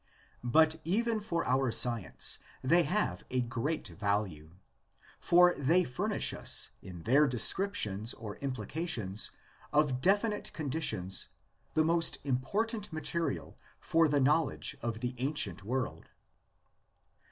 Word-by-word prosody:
But 160 +6 +3
even 225 +6 0
for 205 -5 -3
our 130 -1 +1
science 115 -4 +2 0.2
they 165 +7 +4
have 205 +8 -1
a 130 - -1
great 125 +2 -3
value, 95 -4 -2 0.7
for 175 +1 +5
they 165 +7 +2
furnish 125 -6 0
us - - +1
in 90 -3 -10
their 145 +5 +4
descriptions 120 - +2
or 105 -3 -8
implications 130 - -1 0.4
of 145 -4 +1
definite 205 - +1
conditions 125 - -2 0.5
the 155 - +4
most 165 0 +1
important 205 - -2
material 165 +1 -3 0.2
for 165 0 +2
the 145 -1 +1
knowledge 145 +2 +1
of 115 -1 -4
the 125 0 -2
ancient 125 - -1
world. 115 -8 -4
140 Hz, 115 wpm, -31 LUFS, 115-165 Hz, 0.7 s, for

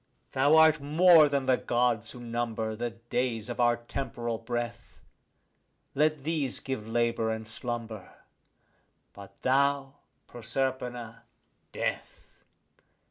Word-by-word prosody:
Thou 140 +4 +4
art 160 -1 +6
more 155 +1 +6
than 140 -2 0
the 130 -1 +3
Gods 120 -2 0
who 125 - -9
number 115 -2 -3
the 120 +2 -3
days 115 0 -3
of 120 - -5
our 120 -1 +3
temporal 120 -2 -4
breath: 120 0 -5 0.9
For 150 +3 +4
these 150 -2 -2
give 130 -5 -5
labour 115 -1 0
and 110 0 -4
slumber; 115 -3 -5 1.0
but 100 -1 -13
thou, 140 +1 +1 0.3
Proserpina, 120 -1 -4 0.5
death. - - -5
120 Hz, 110 wpm, -29 LUFS, 115-135 Hz, 1.0 s, art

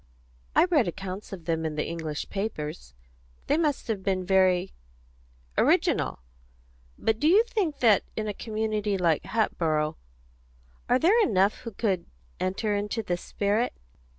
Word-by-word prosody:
"I - - +6
read 310 - +2
accounts 190 +3 -6
of 180 -5 -8
them 165 -1 0
in 155 -1 -2
the 150 - -1
English 160 -3 -4
papers. 150 - -4 0.5
They 285 - +2
must 300 -4 0
have 215 -4 -2
been 190 -1 -1
very 185 -1 +3 0.9
original. - - +2 0.8
But 220 0 0
do 300 - +2
you 400 +7 +6
think 375 -11 -2
that 220 -5 +5
in 215 -1 -2
a 210 - -2
community 215 -2 -2
like 170 -4 +1
Hatboro' 165 -7 0 0.9
Are 250 - +5
there 390 - +4
enough 200 - +2
who 230 - -7
could 195 -4 -1 0.3
enter 200 +3 -1
into 210 +3 -2
the 180 -4 -1
spirit?" 205 +6 -1
200 Hz, 145 wpm, -27 LUFS, 180-230 Hz, 0.9 s, I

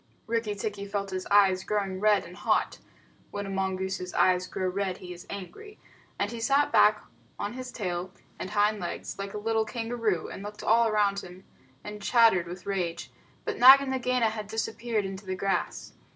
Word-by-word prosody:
Rikki 225 -2 -1
tikki 200 0 -4
felt 200 -1 -3
his 185 0 -4
eyes 195 -2 +4
growing 195 -2 -2
red 210 0 +3
and 175 +2 -11
hot - - 0 0.5
(when 205 0 -5
a 195 - -5
mongoose's 190 -1 -2
eyes 185 0 +3
grow 185 - -2
red, 190 0 -2
he 180 -1 -8
is 175 - -13
angry), 410 - -8 0.4
and 205 +1 -1
he 235 - -6
sat 275 +5 +2
back 215 0 +5 0.3
on 205 +2 -3
his 255 0 -7
tail 180 -5 -3 0.3
and - - -4
hind 210 0 +2
legs 175 +2 -5
like 195 +1 -5
a - - -2
little 220 +1 +1
kangaroo, 225 -5 -2
and - - -8
looked 210 +1 -8
all 230 0 +4
round 205 -2 +2
him, 185 0 -11 0.4
and 210 0 -8
chattered 225 -7 +4
with 175 +1 -8
rage. 180 -4 -3 0.3
But - - -3
Nag 265 +3 +10
and 275 -1 -3
Nagaina 250 -3 +1
had 215 -2 -6
disappeared 220 0 -2
into 195 +1 -7
the 185 - -2
grass. 195 +1 -2
205 Hz, 185 wpm, -28 LUFS, 190-225 Hz, 0.5 s, Nag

